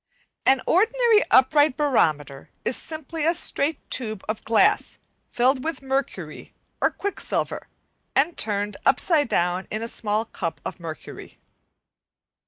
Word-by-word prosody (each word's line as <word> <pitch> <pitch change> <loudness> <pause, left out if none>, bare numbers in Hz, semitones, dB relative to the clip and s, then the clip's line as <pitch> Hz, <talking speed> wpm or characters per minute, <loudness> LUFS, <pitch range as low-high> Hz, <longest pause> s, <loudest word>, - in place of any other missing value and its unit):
An 265 -1 +4
ordinary 455 +3 +4
upright 290 +2 +4
barometer 155 - 0 0.2
is 255 - 0
simply 315 0 -4
a 335 +3 +3
straight 300 -1 -1
tube 215 -5 -2
of 215 0 -3
glass 380 - +2 0.3
filled 255 +2 +2
with 325 -3 -4
mercury 270 +1 -4 0.3
or - - +4
quicksilver, 405 0 -3 0.5
and 300 +5 +2
turned 205 -1 -1
upside 305 -8 +2
down 180 +2 0
in 215 +1 -3
a - - -2
small 215 -1 -1
cup 165 -6 -5
of - - -6
mercury. 160 -3 -9
260 Hz, 125 wpm, -24 LUFS, 210-315 Hz, 0.5 s, An